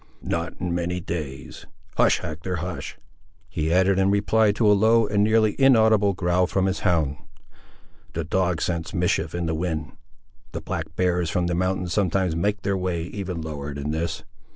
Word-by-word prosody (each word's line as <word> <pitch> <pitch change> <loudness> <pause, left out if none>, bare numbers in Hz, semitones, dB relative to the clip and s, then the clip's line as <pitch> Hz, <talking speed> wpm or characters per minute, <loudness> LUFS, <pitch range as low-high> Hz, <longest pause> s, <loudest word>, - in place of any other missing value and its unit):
"Not 85 0 -2
in 90 -1 -2
many 90 +1 -1
days—Hush, 75 -6 -2
Hector, 80 +4 -4
hush," 85 +1 -5 0.5
he 80 +1 -2
added 95 +2 +3
in 95 0 +3
reply 105 +1 +3
to 110 +2 0
a 105 - +6
low, 110 +3 +4
and 105 0 +1
nearly 110 -1 +3
inaudible, 110 -6 +5
growl 90 0 +1
from 95 0 0
his 95 0 0
hound. 80 -7 +1 1.0
"The 85 - -2
dog 90 0 0
scents 85 -2 -3
mischief 85 0 0
in 85 0 -2
the 80 - -1
wind! 80 -2 -3 0.6
The - - -4
black 80 -1 -5
bears 90 -2 +1
from 90 +2 0
the 85 - -1
mountains 90 0 -1
sometimes 95 -2 +1
make 100 +4 -1
their 100 - 0
way, 90 -3 -2
even 90 -2 -5
lower 75 -2 -5
than 70 +1 -3
this. 80 +2 -3
90 Hz, 170 wpm, -24 LUFS, 80-100 Hz, 1.0 s, a